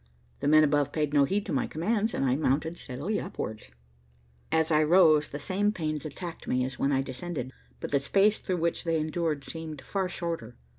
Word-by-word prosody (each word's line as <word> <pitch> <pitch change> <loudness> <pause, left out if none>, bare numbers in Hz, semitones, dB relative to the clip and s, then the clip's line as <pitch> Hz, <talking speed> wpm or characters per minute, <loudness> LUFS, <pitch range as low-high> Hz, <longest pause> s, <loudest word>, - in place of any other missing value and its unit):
The - - -1
men 155 +1 +7
above 145 -1 +2
paid 150 -2 -1
no 140 -1 +5
heed 200 +7 -1
to - - -3
my 135 - +1
commands, 210 +7 0
and - - 0
I 130 -1 +2
mounted 155 +3 0
steadily 160 +8 -3
upwards. 110 0 -6 0.8
As 160 +1 +2
I 155 0 +5
rose 155 -2 +5
the 145 - -5
same 195 +7 0
pains 155 -6 -3
attacked 170 +3 -8
me 125 0 +1
as 130 0 -6
when 140 - +2
I 135 -1 +2
descended, 130 0 -5 0.3
but - - -5
the 140 - +3
space 200 +9 +3
through 185 -2 -2
which 170 0 -1
they 165 -2 +1
endured 155 -2 -1
seemed 160 -1 -7
far 190 -2 -2
shorter. 165 -10 -4
155 Hz, 200 wpm, -28 LUFS, 140-175 Hz, 0.8 s, men